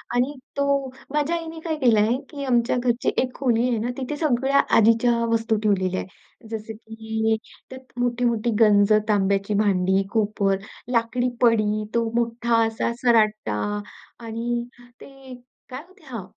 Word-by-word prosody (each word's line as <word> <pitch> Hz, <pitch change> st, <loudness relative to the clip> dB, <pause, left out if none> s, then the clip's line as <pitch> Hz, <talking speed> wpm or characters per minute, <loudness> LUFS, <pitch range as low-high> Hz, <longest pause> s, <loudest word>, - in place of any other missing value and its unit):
आणि 255 Hz, +4 st, +1 dB, 0.2 s
तो 280 Hz, -, +1 dB, 0.5 s
माझ्या 300 Hz, +3 st, +1 dB
आईने 325 Hz, -1 st, -6 dB
काय 320 Hz, -, -1 dB
केलंय 220 Hz, -2 st, +4 dB, 0.2 s
की 285 Hz, -2 st, -7 dB
आमच्या 240 Hz, -1 st, +2 dB
घरची 240 Hz, 0 st, 0 dB
एक 255 Hz, -1 st, -3 dB
खोली 245 Hz, -2 st, +1 dB
आहे 235 Hz, -, 0 dB
ना, 235 Hz, +3 st, -2 dB
तिथे 270 Hz, +2 st, -4 dB
सगळ्या 275 Hz, -2 st, +2 dB, 0.2 s
आधीच्या 230 Hz, +2 st, +4 dB, 0.2 s
वस्तू 225 Hz, -1 st, +1 dB
ठेवलेल्या 185 Hz, -3 st, +1 dB
आहेत. 205 Hz, +4 st, -13 dB
जसं 220 Hz, 0 st, -6 dB
की 220 Hz, 0 st, -2 dB, 0.3 s
त्यात 260 Hz, -1 st, -12 dB
मोठी-मोठी 240 Hz, -1 st, 0 dB
गंज, 205 Hz, -1 st, +5 dB, 0.2 s
तांब्याची 200 Hz, 0 st, +1 dB
भांडी, 190 Hz, -1 st, +2 dB
कोपर, 205 Hz, -3 st, +1 dB, 0.3 s
लाकडी 245 Hz, +1 st, +1 dB
पळी, 215 Hz, -3 st, +2 dB
तो 235 Hz, -, +2 dB
मोठा 235 Hz, 0 st, 0 dB
असा 225 Hz, +1 st, -2 dB
सराटा 215 Hz, -, +2 dB, 0.7 s
आणि 235 Hz, +1 st, -2 dB, 0.4 s
ते 270 Hz, -1 st, -12 dB, 0.4 s
काय 255 Hz, +2 st, -6 dB
होतं? 375 Hz, +1 st, -22 dB
हां, 230 Hz, -8 st, -7 dB
230 Hz, 140 wpm, -23 LUFS, 215-250 Hz, 0.7 s, गंज